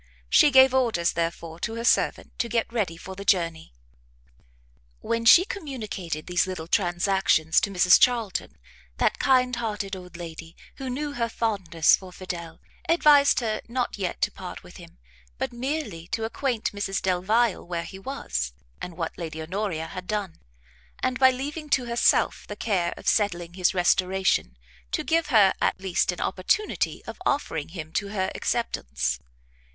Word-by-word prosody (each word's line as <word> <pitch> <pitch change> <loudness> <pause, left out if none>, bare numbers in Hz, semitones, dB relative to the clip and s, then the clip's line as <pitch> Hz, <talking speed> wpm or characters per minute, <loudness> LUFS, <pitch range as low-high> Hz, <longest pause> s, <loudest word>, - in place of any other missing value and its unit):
She - - +7
gave 265 -1 +7
orders, 230 -10 +2
therefore, 165 0 -3
to 225 +5 -3
her 230 - -4
servant - - +1
to 235 - -1
get 230 0 -1
ready 195 -8 -1
for 190 +2 -9
the 200 - -7
journey. 165 -5 0 1.3
When 230 0 -2
she 345 +10 +8
communicated 225 - -5
these 180 +1 +1
little 185 -4 -5
transactions 175 -3 +2
to - - 0
Mrs 180 -2 +5
Charlton, 225 - +1 0.4
that - - +1
kind 250 -2 +3
hearted 210 -4 -3
old 180 -2 -10
lady, 165 -1 -9 0.2
who 265 -2 -5
knew 290 +4 -3
her 235 -4 -2
fondness 190 -9 +2
for 185 -1 -11
Fidel, 180 -3 -7 0.3
advised 295 -5 +5
her 220 -2 -2
not 240 -2 -2
yet 185 -3 -3
to - - +2
part - - -9
with - - -13
him, - - -14 0.4
but - - -3
merely 240 - -4
to 225 +4 -3
acquaint 235 0 -2
Mrs 200 -1 -2
Delvile 190 +4 +1
where 170 -1 -4
he 190 - -9
was, 65 - -4 0.3
and 175 -2 -7
what 165 -2 -3
Lady 160 -2 -5
Honoria 170 0 -3
had 180 +2 -8
done, 205 -5 -3 0.6
and, 255 0 0
by 260 -1 +7
leaving 290 +4 -5
to 260 -3 +2
herself 235 0 +2
the 205 - -6
care 190 -6 0
of - - -10
settling 175 -5 +1
his 185 +1 +1
restoration, 180 - +1 0.4
to - - 0
give 330 -1 +1
her, 215 -9 +5
at - - +1
least, 185 -1 0
an 180 - -6
opportunity 190 - -1
of - - -9
offering 165 - -1
him 160 -2 -8
to 200 - -1
her 195 -2 -2
acceptance. 235 - -2
195 Hz, 160 wpm, -25 LUFS, 175-240 Hz, 1.3 s, she